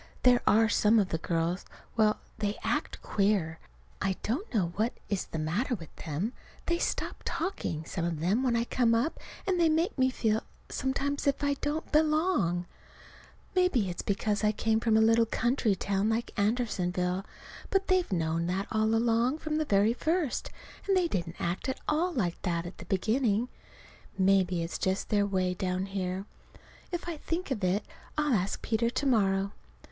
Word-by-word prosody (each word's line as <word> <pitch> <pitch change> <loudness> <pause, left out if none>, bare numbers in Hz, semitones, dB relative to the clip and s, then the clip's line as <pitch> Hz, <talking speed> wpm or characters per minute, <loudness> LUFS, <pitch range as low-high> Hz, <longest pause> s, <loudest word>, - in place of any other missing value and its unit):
There 250 -1 +6
are 225 +2 +5
some 215 +1 +4
of 200 -3 +3
the 160 - -1
girls 170 +2 -1 0.3
well, 215 -2 +3 0.2
they 205 0 -1
act - - -2
queer. 195 -6 +1 0.4
I 190 0 +1
don't 285 - -2
know 180 -7 0
what 225 +4 +1 0.2
is 200 -3 -1
the - - -5
matter 180 - 0
with 165 -7 -11
them. 170 - -3 0.3
They 340 0 +1
stop - - -2
talking 245 - -3
some 170 - -3
of 170 -2 -1
them 190 +9 +2
when 250 -3 +2
I 230 - +2
come 235 -1 +2
up, 250 +8 0 0.3
and 370 -2 +1
they 335 -1 +5
make 320 +3 +1
me 260 0 +4
feel, 220 -3 +1 0.3
sometimes, 275 +2 -1
as 280 - +4
if - - -10
I 285 0 +3
didn't 295 +3 -3
belong. 305 - +2 0.9
Maybe 280 - +3
it's 175 - -4
because 205 +1 -1
I 210 - +4
came 220 +1 +1
from 225 -1 +3
a - - +5
little 225 +1 +5
country 235 -3 +1
town 200 +2 0
like 225 +1 -1
Andersonville. 190 -4 0 0.5
But 390 0 +2
they've 370 - +2
known 165 -1 0
that 190 +3 -1
all 220 +1 +2
along, 235 +4 +2
from 310 -1 -2
the 310 - 0
very 205 -1 +3
first. 315 +1 -1 0.4
And 390 -1 +4
they 360 -2 +3
didn't 170 - -3
act 175 +9 -2
at 265 - -3
all 330 +4 +1
like 195 - -1
that 170 -2 -1
at 175 - -9
the - - -9
beginning. 220 +4 +1 0.7
Maybe 190 -2 +3
it's 165 - -4
just 190 +1 -1
their 205 -1 +2
way 185 -2 0
down 185 0 -1
here. 190 -1 -3 0.7
If 350 -1 -4
I 335 -2 -3
think 330 +1 -3
of 215 -7 -2
it 190 +3 +1 0.3
I'll 295 -3 +2
ask 195 -2 0
Peter 230 +1 +1
to 280 - -2
morrow. 195 -6 +2
215 Hz, 180 wpm, -29 LUFS, 185-265 Hz, 0.9 s, There